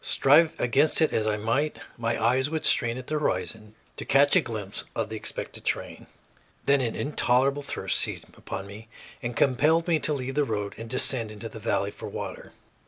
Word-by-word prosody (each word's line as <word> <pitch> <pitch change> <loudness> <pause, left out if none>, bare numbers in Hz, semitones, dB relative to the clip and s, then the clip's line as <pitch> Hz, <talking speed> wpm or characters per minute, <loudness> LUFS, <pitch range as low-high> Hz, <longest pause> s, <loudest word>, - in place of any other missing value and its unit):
Strive 155 +4 +4
against 135 +5 +3
it 160 - +3
as 110 -1 +1
I 105 -1 +1
might, 115 +8 0 0.2
my 115 0 -1
eyes 130 +5 +2
would 160 0 -3
strain 120 -2 +2
at 130 - -7
the 155 +2 -2
horizon 105 - -3 0.2
to - - -4
catch 140 +1 +4
a - - +6
glimpse 105 -4 -5
of - - -2
the - - -5
expected - - -3
train. - - -3 0.6
Then 140 -1 +4
an 115 -3 -2
intolerable 140 0 +1
thirst - - -2
seized - - -1
upon 95 - -6
me 105 +3 -11 0.3
and 120 0 -4
compelled 150 +6 +3
me 165 -2 +3
to 155 - +2
leave 135 -2 -2
the 145 +1 +2
road 105 -5 -3
and 115 0 -8
descend 120 -2 +2
into 105 +1 -8
the 110 - -9
valley 100 -2 -1
for - - -8
water. - - -7
125 Hz, 195 wpm, -26 LUFS, 110-145 Hz, 0.6 s, a